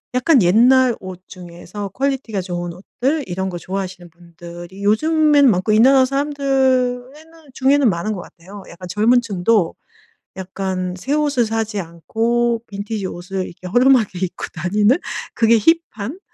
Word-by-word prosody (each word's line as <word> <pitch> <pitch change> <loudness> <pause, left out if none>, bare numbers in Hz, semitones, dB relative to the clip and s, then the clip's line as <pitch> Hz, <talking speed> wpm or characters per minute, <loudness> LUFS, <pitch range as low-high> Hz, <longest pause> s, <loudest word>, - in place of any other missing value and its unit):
약간 255 0 +4
옛날 245 +7 +4
옷 185 -1 -9
중에서 180 +2 -9
퀄리티가 260 -4 -2
좋은 175 -1 -5
옷들 270 - -3
이런 190 +1 -3
거 175 - -5
좋아하시는 185 -1 -6
분들이 175 +2 -11
요즘에는 295 +5 +4
많고 190 +2 0
이 215 - +4
나라 265 +2 +6
사람들에는 270 0 -1 0.2
중에는 270 0 +3
많은 185 +4 -2
것 190 - -5
같아요. 190 +4 -13
약간 180 +1 -11
젊은 220 +7 +3
층도 200 -3 0 0.6
약간 185 -1 -4
새 265 +10 -3
옷을 290 -5 +1
사지 220 -1 -2
않고 225 +8 -1
빈티지 205 0 -5
옷을 185 +1 -5
이렇게 180 +1 -10
허름하게 245 -3 +3
입고 185 -1 -4
다니는 205 - +2 0.4
그게 230 0 +4
힙한 320 - 0
215 Hz, 315 characters per minute, -19 LUFS, 185-260 Hz, 0.6 s, 나라